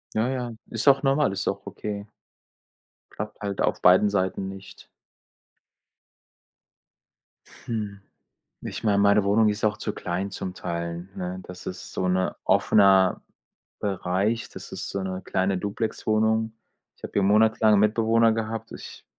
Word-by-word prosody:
Ja, 110 +3 +1
ja, 125 -2 -3 0.2
ist 115 +4 -4
auch 135 0 +6
normal, 135 -4 +2
ist 100 - -3
auch - - -5
okay. 100 -1 -6 1.0
Klappt 105 +1 -7
halt 100 -2 -3
auf - - 0
beiden 95 +3 +6
Seiten 95 -1 -1
nicht. 95 0 -11 2.8
Hm, 105 -3 -4 0.6
ich - - -6
meine, 100 -2 +3
meine 100 0 +4
Wohnung 105 +2 +4
ist 105 +1 -2
auch 105 0 +2
zu 105 - -3
klein 90 +3 -3
zum 95 -1 -5
Teil, 85 0 -4
ne? 90 0 -5
Das 90 0 -10
ist 90 - -7
so 90 - -1
'ner 95 0 0
offener 95 -2 +4 0.6
Bereich, 100 +3 -1
das - - -10
ist - - -5
so 100 - -3
'ne 95 0 -4
kleine 95 0 0
Duplexwohnung. 110 +2 0 0.4
Ich - - -30
habe - - -7
hier 100 - +2
monatelang 110 +1 +4
Mitbewohner 115 +2 +3
gehabt. 115 0 -4
Ich - - -10
100 Hz, 140 wpm, -25 LUFS, 95-110 Hz, 2.8 s, auch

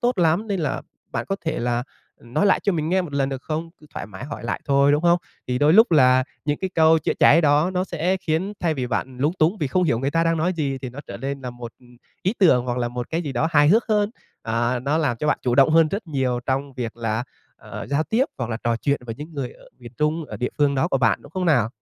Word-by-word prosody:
tốt 245 -3 0
lắm, 170 +5 +2
nên 195 -4 -2
là 150 - -2 0.3
bạn - - -3
có 195 - -1
thể 160 -1 -1
là 120 0 -1 0.4
nói 120 +12 0
lại 200 - +3
cho 200 - +1
mình 155 -2 -1
nghe 185 +2 +2
một 160 -5 -8
lần, 135 -1 0
được 135 -2 -5
không?" 160 +1 -4
Cứ 150 - -16
thoải - - -5
mái 105 +4 -9
hỏi 145 - -7
lại - - -2
thôi, 140 0 +3
đúng 150 +2 +1
không? 175 0 +4 0.3
Thì 125 - 0
đôi 150 +3 +4
lúc 220 -1 +6
là 130 -3 +5 0.2
những 145 0 -1
cái 190 - -2
câu 160 0 +5
chữa - - -1
cháy 165 - +6
đó 150 +2 +3
nó 185 0 -1
sẽ 180 +1 -1
khiến 180 +3 -2
thay 165 -3 +1
vì 130 -3 -2
bạn 125 +1 -3
lúng 145 +5 +1
túng 170 +7 +2
vì 150 - 0
không 180 +7 +1
hiểu 120 -9 +1
người 135 +2 -1
ta 165 +2 +1
đang 165 0 +2
nói 170 +4 +1
gì 140 -6 -2
thì 130 -2 -6
nó 130 +4 -8
trở - - -7
nên 140 +1 -4
là 125 -2 -5
một 120 -1 -9 0.5
ý 190 +5 0
tưởng 130 -11 +4
hoặc 125 0 -2
là 120 -1 -1
một 120 0 -6
cái 165 +2 -1
gì 145 - -4
đó 140 +6 0
hài 145 -2 +5
hước 220 +7 +4
hơn. 210 -1 +2 0.3
À, 120 +2 0
nó 140 +5 0
làm 145 -7 0
cho 150 - -3
bạn - - +2
chủ 120 - +1
động 135 +3 +5
hơn 160 0 +5
rất 200 +3 -4
nhiều 130 -5 -1
trong 135 +1 -1
việc 120 -3 -5
là, 115 0 -2 0.3
à, - - -8
giao 140 +2 +1
tiếp 225 - +1
hoặc 120 -2 -3
là 110 - -2
trò 115 0 +1
chuyện 140 +4 -1
với 115 - -4
những 150 +6 -10
người 135 -4 -4
ở - - -19
miền 120 -2 -12
Trung, 155 +1 0
ở - - -8
địa 125 - -2
phương 145 -1 +3
đó 130 - +1
của 135 - +1
bạn, 115 -6 +2
đúng - - -14
không 185 0 -2
nào? 125 -9 +3
145 Hz, 285 wpm, -23 LUFS, 125-165 Hz, 0.5 s, lúc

